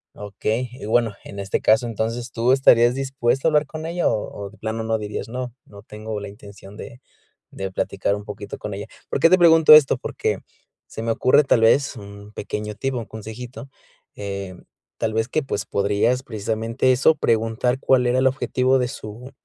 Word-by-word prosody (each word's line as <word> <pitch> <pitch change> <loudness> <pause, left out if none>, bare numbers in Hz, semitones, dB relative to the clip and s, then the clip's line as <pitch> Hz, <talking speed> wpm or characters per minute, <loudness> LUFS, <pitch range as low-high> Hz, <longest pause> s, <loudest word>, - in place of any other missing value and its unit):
Okey. 110 +4 -3
Y 125 - -9
bueno, 115 -1 +1
en 100 - -9
este 100 0 -1
caso, 110 +2 +3
entonces, 115 +2 -3
¿tú 120 +2 +1
estarías 120 -2 +5
dispuesto 135 0 0
a - - +6
hablar 150 0 +2
con 155 +3 -7
ella?, 175 +1 0
o 105 -1 -3
o 100 - -7
de 110 - -18
plano 110 +1 -3
no, 110 0 -1
dirías: 105 0 -5
"No, 125 +1 -6
no 100 -1 -14
tengo 110 0 -7
la 100 - -7
intención 100 -1 -13
de 120 +3 -10 0.5
de 95 -1 -5
platicar 100 +1 -1
un 105 - -7
poquito 105 0 -8
con 105 -2 -5
ella". 100 - -6 0.2
¿Por - - -1
qué 165 - +6
te 185 - +7
pregunto 165 -2 +7
esto? 150 -3 +7
Porque - - -2 0.5
se - - -8
me 115 0 -1
ocurre, 130 +6 +4
tal 120 - +3
vez, 135 +5 +3
un 100 -1 -11
pequeño 105 0 -5
tip, 135 +4 -2
o 125 - -2
un 115 - -6
consejito, 115 +5 -9 0.5
em, 100 -2 -6 0.3
tal 110 -1 -1
vez 110 0 +1
que, 155 - 0
pues, 105 -7 -4
podrías 105 +5 +1
precisamente 115 +2 -1
eso, 140 +5 +4
preguntar 115 0 0
cuál 130 -2 +3
era 125 +1 +2
el 130 - +4
objetivo 130 0 +1
de 125 - 0
su 120 +1 -9
115 Hz, 195 wpm, -22 LUFS, 105-130 Hz, 0.5 s, te